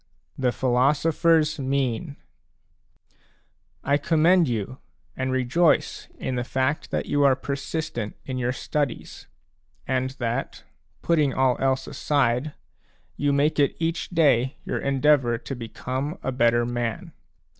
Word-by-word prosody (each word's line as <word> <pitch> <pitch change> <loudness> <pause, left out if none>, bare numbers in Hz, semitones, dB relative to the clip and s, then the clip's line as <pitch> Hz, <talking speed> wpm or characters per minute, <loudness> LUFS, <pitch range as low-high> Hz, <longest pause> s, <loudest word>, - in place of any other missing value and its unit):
THE 125 -2 +1
PHILOSOPHER'S 150 +5 +2
MEAN 135 +1 -1 1.7
I 140 +1 +2
commend 165 +3 +3
you 120 +2 -3 0.4
and 130 0 -2
rejoice 130 +6 +1
in - - -3
the 125 -1 -1
fact 130 +3 -1
that - - -2
you 145 0 +1
are 135 -2 +5
persistent 140 -4 -4
in 130 -1 -4
your 125 0 0
studies, 140 +1 -4 0.6
and 130 0 0
that, 120 +2 -3 0.4
putting 150 -5 +2
all 130 -1 +3
else 130 0 +1
aside, 140 0 0 0.6
you 145 0 0
make 145 +2 +1
it 140 - +2
each 165 +1 -2
day 140 -7 +2
your - - -2
endeavour 135 -3 +2
to 135 +3 -7
become 130 - -4
a 130 - -1
better 120 -2 +2
man. 120 -2 -3
135 Hz, 125 wpm, -24 LUFS, 125-150 Hz, 1.7 s, are